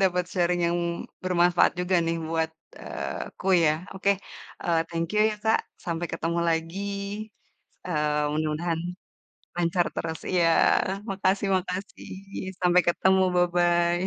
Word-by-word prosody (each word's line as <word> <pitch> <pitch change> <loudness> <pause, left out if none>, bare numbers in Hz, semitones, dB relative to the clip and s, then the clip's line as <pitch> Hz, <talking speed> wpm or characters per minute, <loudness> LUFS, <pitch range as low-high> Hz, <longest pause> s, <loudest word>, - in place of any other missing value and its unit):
dapet 180 -1 +2
sharing 175 -1 +1
yang 170 +1 +1 0.5
bermanfaat 175 -1 +4
juga 180 +1 +2
nih 165 0 0
buat, 160 0 0 0.3
eee, - - -5
aku - - -11 0.2
ya 150 - +5 0.2
oke, 195 +1 +1 0.5
eee, 165 -2 +2
thank 165 0 -2
you 210 - +2
ya 215 - -3
Kak, 220 0 +4 0.3
sampai 170 0 -2
ketemu 165 +1 -1
lagi, 165 +3 -1 1.1
eee, 150 -3 0
mudah-mudahan, 155 +2 -1 0.8
lancar 175 0 +1
terus 160 -1 -3
iya 175 -2 +3 0.6
makasih 195 +1 +1
makasih 185 +2 -5 0.5
sampai 180 0 +4
ketemu 190 +2 +3
bye-bye. 175 0 +2
175 Hz, 125 wpm, -26 LUFS, 165-180 Hz, 1.1 s, ya